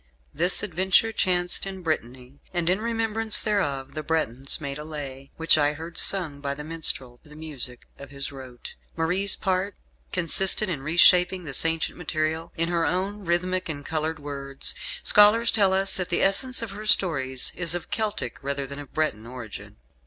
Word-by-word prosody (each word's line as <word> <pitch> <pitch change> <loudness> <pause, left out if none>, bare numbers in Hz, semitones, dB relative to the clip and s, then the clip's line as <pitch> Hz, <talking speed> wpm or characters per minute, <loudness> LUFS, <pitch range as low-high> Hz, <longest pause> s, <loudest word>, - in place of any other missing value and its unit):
This 175 +6 +4
adventure 190 +4 +2
chanced 180 -2 +1
in 190 -1 -7
Brittany, 130 -3 -4 0.2
and 175 0 +2
in 190 +3 0
remembrance 225 -1 +1
thereof 140 -11 -1
the 155 - -4
Bretons 140 -4 -1
made 140 -1 -5
a - - -6
Lay, 140 -3 -8
which 165 -1 +5
I 145 0 +2
heard 165 +2 -9
sung 165 -8 +1
by 140 -1 -3
the 150 - -7
minstrel 150 -6 -3
to 150 - -20
the 150 - -13
music 140 -6 -6
of 140 - -10
his 140 0 -5
rote. 130 -3 -10 0.2
Marie's 185 +5 +2
part 190 0 -1 0.4
consisted 190 +4 +2
in 155 -7 -3
reshaping 180 +4 +4
this 145 -1 -1
ancient 165 +1 -1
material 160 0 -2
in 165 +1 0
her 170 -1 +1
own 190 +5 -2
rhythmic 180 +1 -1
and 145 -2 -4
coloured 160 0 -2
words. 140 -2 -4 0.3
Scholars 220 +3 +6
tell 200 -3 +3
us 190 0 +1
that 180 -2 -3
the 175 - +1
essence 240 +6 +2
of 225 - -6
her 210 +2 -8
stories 135 -11 +3
is 175 -1 -1
of 175 - -7
Celtic 215 -1 -2
rather 140 0 -2
than 140 +1 -8
of 145 -2 -11
Breton 115 -8 -1
origin. 120 - -10
165 Hz, 175 wpm, -25 LUFS, 140-190 Hz, 0.4 s, Scholars